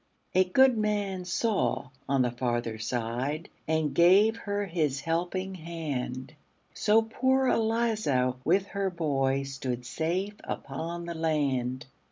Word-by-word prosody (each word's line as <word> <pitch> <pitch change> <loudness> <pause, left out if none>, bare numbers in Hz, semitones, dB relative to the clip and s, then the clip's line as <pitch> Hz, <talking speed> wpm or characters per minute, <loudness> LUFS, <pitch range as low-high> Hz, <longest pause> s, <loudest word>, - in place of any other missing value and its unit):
A 185 0 +5
good 250 +5 +4
man 205 -3 -1
saw 200 - 0 0.2
on 135 -2 +3
the 125 - 0
farther 120 -2 -2
side, 125 +7 -2 0.2
And 160 -2 +1
gave 195 +6 +6
her 205 -2 -2
his 155 -7 -1
helping 180 +4 -2
hand; 155 -6 -5 0.4
So 220 +1 +3
poor 260 +4 +1
Eliza, 220 - +1
with 185 +6 +3
her 200 -1 -1
boy, 140 -6 0
Stood 130 -3 -4
safe 180 +9 -2
upon 165 +5 -5
the 170 - -4
land. 140 -6 0
165 Hz, 125 wpm, -28 LUFS, 135-200 Hz, 0.4 s, gave